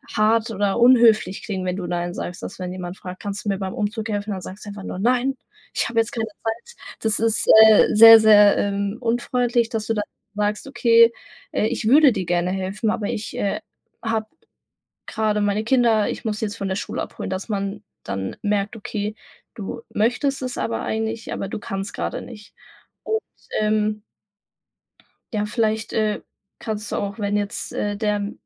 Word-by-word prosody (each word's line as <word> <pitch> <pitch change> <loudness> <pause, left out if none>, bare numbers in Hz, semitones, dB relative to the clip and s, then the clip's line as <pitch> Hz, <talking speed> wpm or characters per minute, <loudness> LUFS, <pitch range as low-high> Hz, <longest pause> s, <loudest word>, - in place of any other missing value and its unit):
hart 225 +1 +2
oder 205 +1 0
unhöflich 230 -6 +5
klingen, 190 -3 -4
wenn 180 0 -1
du 185 - -4
Nein 175 0 -2
sagst. 175 0 -6
Dass - - -7
wenn 180 -1 -4
jemand 180 0 -6
fragt: 185 -1 -9
„Kannst 200 +1 -5
du 205 - 0
mir 195 - 0
beim 190 -1 -4
Umzug 220 +2 -3
helfen?“, 205 0 -2
dann 190 -2 -4
sagst 190 +4 -9
du - - -7
einfach 200 -1 -8
nur: 185 - -6
„Nein, 250 +4 +1 0.4
ich - - 0
habe 230 0 +1
jetzt 225 - +1
keine 225 -2 -2
Zeit.“ 225 - -6 0.3
Das 220 -2 +1
ist, 225 0 +2 0.2
äh, 215 - +6
sehr, 225 +1 +10
sehr, 210 -2 +6
ähm, 200 +1 -1
unfreundlich, 240 0 0
dass 220 -3 -3
du 225 - +1
dann 210 -1 -2 0.3
sagst: 210 +4 -1
„Okay, 230 -3 +5 0.4
äh, - - 0
ich 230 -2 -2
würde 285 +1 +7
dir 190 -3 -3
gerne 175 +1 0
helfen, 195 +4 -2
aber 205 - -2
ich, 215 - -4
äh, 200 - -1 0.4
habe 225 -1 -1 0.8
grade 215 -1 0
meine 205 +1 0
Kinder, 230 -4 +3
ich - - -6
muss 210 -1 -2
sie - - -1
jetzt 205 +1 -5
von 195 -2 -3
der 190 - -1
Schule - - -4
abholen“, - - -6
dass 190 +1 -4
man 200 0 -3 0.2
dann 95 0 -4
merkt, 205 +2 -1
okay, 210 -1 -4 0.4
du 225 +3 -6
möchtest 250 +6 0
es 255 -1 -4
aber 115 -1 -2
eigentlich, 220 0 -3
aber 195 - -4
du - - -5
kannst 195 0 -5
grade - - -3
nicht. 210 -4 -12 0.5
Und, 440 0 0 0.4
ähm 215 0 +1 1.3
ja, 210 -1 0
vielleicht, 220 0 -1
äh, 215 -1 0 0.4
kannst 215 -1 -5
du - - -1
auch, 200 +2 -4
wenn 205 0 -1
jetzt, 205 0 -4
äh, 205 0 -2
der 210 -1 -1
210 Hz, 190 wpm, -22 LUFS, 200-225 Hz, 1.3 s, sehr